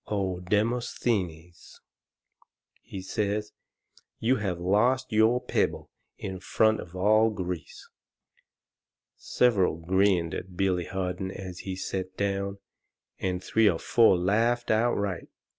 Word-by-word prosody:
O 95 Hz, -4 st, -2 dB
Demosthenes!" 95 Hz, -4 st, -2 dB, 1.0 s
he 95 Hz, -1 st, -8 dB
says, 105 Hz, +2 st, -2 dB, 0.7 s
"you 125 Hz, +4 st, +2 dB
have 95 Hz, -5 st, -2 dB
lost 105 Hz, +10 st, +2 dB
your 110 Hz, +3 st, +4 dB
pebble -, -, -1 dB, 0.3 s
in 95 Hz, -1 st, -6 dB
front 110 Hz, +3 st, +2 dB
of 85 Hz, -, -9 dB
all 110 Hz, +4 st, +4 dB
Greece." 90 Hz, -5 st, -6 dB, 1.3 s
Several 105 Hz, -9 st, +2 dB
grinned 90 Hz, 0 st, +1 dB
at 90 Hz, -1 st, -7 dB
Billy 90 Hz, -2 st, +1 dB
Harden 95 Hz, 0 st, -3 dB
as 95 Hz, -2 st, -8 dB
he 95 Hz, -1 st, -5 dB
set 95 Hz, 0 st, -5 dB
down, 100 Hz, 0 st, -1 dB, 0.6 s
and 90 Hz, -1 st, -2 dB
three 110 Hz, -2 st, +3 dB
or 85 Hz, -, 0 dB
four 115 Hz, +1 st, +4 dB
laughed 115 Hz, +7 st, +1 dB
outright. 105 Hz, -5 st, 0 dB
95 Hz, 110 wpm, -27 LUFS, 90-110 Hz, 1.3 s, your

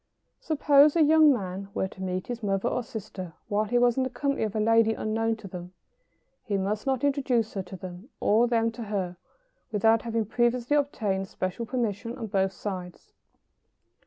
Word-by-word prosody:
] -, -, -50 dB
Suppose 295 Hz, -1 st, +5 dB
a 330 Hz, -, +5 dB
young 310 Hz, 0 st, +6 dB
man 195 Hz, -5 st, -3 dB
were 190 Hz, -, 0 dB
to 190 Hz, -, -12 dB
meet 185 Hz, 0 st, -2 dB
his 240 Hz, -1 st, -5 dB
mother 195 Hz, +1 st, 0 dB
or 250 Hz, -, 0 dB
sister 190 Hz, -6 st, -7 dB, 0.2 s
while 210 Hz, +1 st, +1 dB
he 245 Hz, +3 st, +1 dB
was 240 Hz, 0 st, +3 dB
in 265 Hz, -, +2 dB
the 260 Hz, -, -1 dB
company 275 Hz, +2 st, -2 dB
of 215 Hz, -1 st, -3 dB
a -, -, +1 dB
lady 225 Hz, +1 st, +4 dB
unknown 225 Hz, +1 st, -1 dB
to 215 Hz, -2 st, -10 dB
them, 180 Hz, -1 st, -8 dB, 0.7 s
he 205 Hz, -5 st, -1 dB
must 205 Hz, +5 st, -2 dB
not 265 Hz, -1 st, 0 dB
introduce 265 Hz, -6 st, +1 dB
her 195 Hz, -, -2 dB
to 190 Hz, +1 st, -9 dB
them 185 Hz, +5 st, -9 dB
or 225 Hz, +3 st, +3 dB
them 230 Hz, -1 st, +1 dB
to 230 Hz, 0 st, -7 dB
her 190 Hz, -4 st, -3 dB, 0.5 s
without 225 Hz, +2 st, +3 dB
having 230 Hz, -2 st, -1 dB
previously 240 Hz, +4 st, +1 dB
obtained 210 Hz, -10 st, 0 dB
special 185 Hz, +6 st, -4 dB
permission 235 Hz, -1 st, -2 dB
on 235 Hz, -, -4 dB
both 195 Hz, -2 st, +1 dB
sides. 180 Hz, -2 st, -7 dB
225 Hz, 190 wpm, -27 LUFS, 195-245 Hz, 0.7 s, young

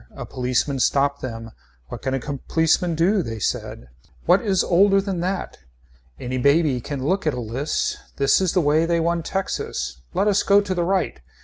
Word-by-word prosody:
A -, -, -6 dB
policeman 130 Hz, +2 st, -1 dB
stopped 140 Hz, +3 st, +1 dB
them. 115 Hz, -2 st, -6 dB, 0.4 s
What -, -, -7 dB
can 130 Hz, 0 st, -1 dB
a -, -, -1 dB
policeman 160 Hz, +5 st, 0 dB
do, 185 Hz, +5 st, +2 dB
they 115 Hz, -8 st, -5 dB
said. 80 Hz, -, -3 dB, 0.4 s
What -, -, +4 dB
is 195 Hz, -4 st, +1 dB
older 195 Hz, +3 st, +4 dB
than 195 Hz, -2 st, -3 dB
that. 185 Hz, +2 st, -3 dB, 0.6 s
Any 130 Hz, +1 st, -3 dB
baby 140 Hz, -1 st, +3 dB
can 135 Hz, +1 st, -5 dB
look 185 Hz, +2 st, 0 dB
at 150 Hz, -, +1 dB
a -, -, -4 dB
list. 120 Hz, +6 st, -2 dB, 0.2 s
This 140 Hz, +5 st, +3 dB
is 185 Hz, -3 st, +1 dB
the 185 Hz, -, +3 dB
way 155 Hz, +2 st, +2 dB
they 170 Hz, 0 st, +1 dB
won 170 Hz, +1 st, 0 dB
Texas 160 Hz, -, -4 dB
Let 205 Hz, -, +2 dB
us 205 Hz, -1 st, +3 dB
go 200 Hz, 0 st, +5 dB
to 200 Hz, -2 st, -2 dB
the 175 Hz, -1 st, 0 dB
right. 190 Hz, -, -1 dB
160 Hz, 190 wpm, -22 LUFS, 130-185 Hz, 0.6 s, go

